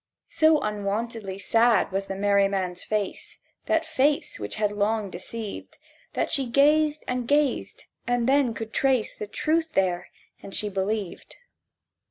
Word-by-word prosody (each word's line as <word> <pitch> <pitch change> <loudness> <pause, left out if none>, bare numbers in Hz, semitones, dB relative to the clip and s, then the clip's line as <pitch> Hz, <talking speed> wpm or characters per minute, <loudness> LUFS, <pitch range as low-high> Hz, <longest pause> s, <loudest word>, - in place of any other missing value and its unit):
So 315 -1 +4
unwontedly 210 0 -3
sad 225 +4 +3
was 195 +1 -2
the 195 - -4
merry 200 0 +3
man's 185 -2 -3
face— 210 -2 -3 0.3
That - - +2
face 285 - +1
which 105 -1 -4
had 210 -1 0
long 205 0 0
deceived— 210 +4 -7 0.4
That - - -1
she 275 -5 +1
gazed 300 +4 +3
and 250 -1 -2
gazed; 290 -1 0 0.2
and 245 -1 +1
then 265 -4 +3
could 225 0 -6
trace 260 -5 +1
The 210 - -6
truth 320 +8 0
there; 180 -2 0 0.3
and 195 - -8
she 210 - -1
believed. 195 0 -3
220 Hz, 145 wpm, -25 LUFS, 200-265 Hz, 0.4 s, So